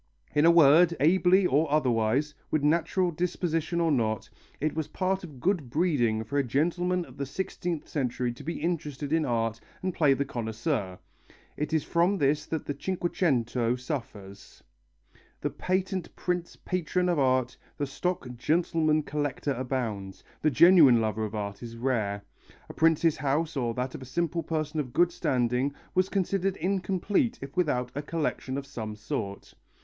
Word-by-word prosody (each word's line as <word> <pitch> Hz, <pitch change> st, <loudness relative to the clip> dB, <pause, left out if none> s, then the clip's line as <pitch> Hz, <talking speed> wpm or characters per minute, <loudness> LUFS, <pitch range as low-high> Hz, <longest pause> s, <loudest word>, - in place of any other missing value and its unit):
In 150 Hz, +2 st, +4 dB
a -, -, +8 dB
word, 170 Hz, +1 st, +6 dB
ably 185 Hz, +4 st, +4 dB
or 150 Hz, -1 st, +2 dB
otherwise, 130 Hz, 0 st, +1 dB, 0.2 s
with 155 Hz, -2 st, 0 dB
natural 170 Hz, +4 st, +2 dB
disposition 170 Hz, 0 st, -1 dB
or 165 Hz, -1 st, +2 dB
not, 110 Hz, -5 st, 0 dB, 0.3 s
it 155 Hz, 0 st, 0 dB
was 160 Hz, -2 st, -2 dB
part 190 Hz, 0 st, -1 dB
of 150 Hz, -7 st, -10 dB
good 170 Hz, -5 st, 0 dB
breeding 120 Hz, -8 st, +1 dB
for 140 Hz, +6 st, -1 dB
a -, -, +2 dB
gentleman 175 Hz, +7 st, 0 dB
of -, -, -15 dB
the 140 Hz, -, -2 dB
sixteenth 175 Hz, +1 st, -4 dB
century 125 Hz, -3 st, -1 dB
to -, -, -12 dB
be 165 Hz, -, -3 dB
interested 150 Hz, -4 st, -2 dB
in 160 Hz, -1 st, +2 dB
art 115 Hz, -2 st, 0 dB, 0.2 s
and 185 Hz, -1 st, -1 dB
play 145 Hz, -5 st, +4 dB
the 140 Hz, -, -1 dB
connoisseur. 115 Hz, -, -3 dB, 0.6 s
It 150 Hz, +1 st, -3 dB
is 160 Hz, -2 st, +1 dB
from 175 Hz, +4 st, +2 dB
this 145 Hz, -1 st, +1 dB
that 160 Hz, -2 st, -3 dB
the 145 Hz, -, -2 dB
Cinquecento 135 Hz, -8 st, 0 dB
suffers. 115 Hz, -7 st, -7 dB, 0.8 s
The -, -, -2 dB
patent 185 Hz, -1 st, -2 dB
prince 180 Hz, -1 st, -2 dB
patron 180 Hz, 0 st, -1 dB
of 175 Hz, -4 st, +1 dB
art, 130 Hz, -2 st, +2 dB, 0.2 s
the 145 Hz, -, -1 dB
stock 175 Hz, +3 st, -3 dB
gentleman 155 Hz, +2 st, +1 dB
collector 145 Hz, -1 st, -2 dB
abounds, 120 Hz, -7 st, -4 dB, 0.2 s
the 155 Hz, -, +3 dB
genuine 155 Hz, -4 st, +7 dB
lover 110 Hz, -1 st, -1 dB
of 105 Hz, +1 st, -6 dB
art 100 Hz, -1 st, -4 dB
is 115 Hz, -1 st, -8 dB
rare. 110 Hz, -5 st, -1 dB, 0.5 s
A -, -, -7 dB
prince's 165 Hz, 0 st, +3 dB
house 150 Hz, +3 st, 0 dB
or 120 Hz, -4 st, -1 dB
that 125 Hz, +1 st, -2 dB
of -, -, -7 dB
a -, -, -8 dB
simple 170 Hz, +5 st, -1 dB
person 155 Hz, -1 st, -2 dB
of 130 Hz, -5 st, -4 dB
good 175 Hz, 0 st, +4 dB
standing 125 Hz, -1 st, 0 dB, 0.2 s
was 185 Hz, +1 st, +2 dB
considered 195 Hz, 0 st, 0 dB
incomplete 195 Hz, -, 0 dB
if 135 Hz, +3 st, -9 dB
without 125 Hz, -9 st, 0 dB
a 145 Hz, -, -3 dB
collection 150 Hz, -3 st, -2 dB
of 140 Hz, -, -4 dB
some 110 Hz, -6 st, -6 dB
sort. 105 Hz, -3 st, -5 dB
150 Hz, 165 wpm, -28 LUFS, 125-170 Hz, 0.8 s, a